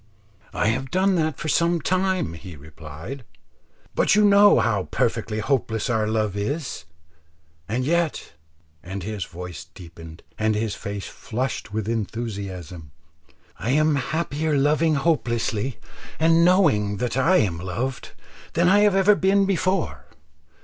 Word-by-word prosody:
"I 105 - 0
have 130 +4 -2
done 190 +5 +2
that 155 -3 0
for - - -5
some 170 +2 +2
time," 185 - 0
he 85 +1 -10
replied, 75 - -9 0.7
"but - - +3
you 210 0 +5
know 205 -5 +6
how 105 -4 0
perfectly 110 -1 -1
hopeless 110 -1 -1
our 110 -2 +1
love 110 -2 -1
is; 125 - -3 0.8
and 125 +4 -1
yet," 170 +1 -1 0.5
and 95 +1 -6
his 105 -1 -4
voice 90 0 -8
deepened 85 -2 -13 0.2
and 110 0 +1
his 110 -1 -1
face 100 -1 -6
flushed 125 -1 -4
with 110 -1 -3
enthusiasm, 100 -7 -5 0.7
"I 115 - -3
am 155 +1 +3
happier 150 +1 -1
loving 150 +3 +2
hopelessly 125 -6 0 0.4
and 165 +1 +4
knowing 145 - +3
that 125 +1 -2
I 165 +8 +4
am 90 -6 0
loved, 115 +9 -4 0.4
than 170 +1 +2
I 200 +3 +5
have 205 -2 +4
ever 195 +2 +5
been 195 0 +3
before. 185 -1 -1
125 Hz, 135 wpm, -23 LUFS, 100-165 Hz, 0.8 s, know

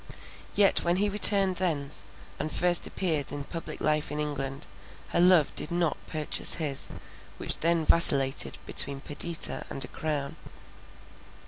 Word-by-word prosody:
Yet 200 -1 +4
when 175 0 +1
he 205 +2 0
returned 195 -2 +4
thence, 150 -6 -2 0.3
and 155 +1 -4
first 175 0 +1
appeared 155 -8 -1
in 145 0 -5
public 165 +3 -8
life 150 -1 0
in 150 - -4
England, 140 -2 -4 0.4
her - - -1
love 180 -4 +4
did - - -3
not 170 -2 0
purchase 155 -2 +1
his, 145 -5 -3 0.5
which - - +3
then 165 -1 +1
vacillated 135 -9 +2
between 140 +6 +3
Perdita 160 +3 -4
and 135 - -3
a - - -11
crown. 145 -3 -4
155 Hz, 140 wpm, -27 LUFS, 140-175 Hz, 0.5 s, Yet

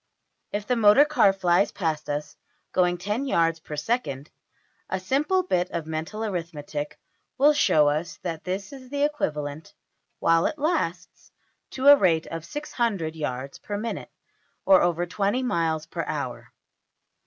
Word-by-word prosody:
If 205 0 -3
the 250 - +1
motor 225 +5 +6
car 295 -9 +4
flies 185 0 +2
past 155 -5 -2
us 145 +1 -3 0.4
going 180 -1 +2
$10$~yards 185 - 0
per 155 - -8
second, 145 - -2 0.6
a 190 - -1
simple 295 - +1
bit 180 - 0
of 170 -2 -4
mental 160 +8 -4
arithmetic 160 -6 -4 0.4
will 290 +3 +6
show 155 - +4
us 155 +4 -1
that 165 -3 -4
this 195 +5 -4
is 260 -2 -12
equivalent 160 - -2 0.4
while 165 0 +3
it 305 - -4
lasts 280 - -2 0.4
to 260 - -5
a 285 0 +11
rate 170 - +2
of 165 0 -6
$600$~yards 160 - -3
per 205 - -5
minute, 225 +3 -4 0.6
or 190 -1 +7
over 175 0 +1
$20$~miles 185 -5 0
per - - -4
hour. - - -5
180 Hz, 135 wpm, -25 LUFS, 160-240 Hz, 0.6 s, a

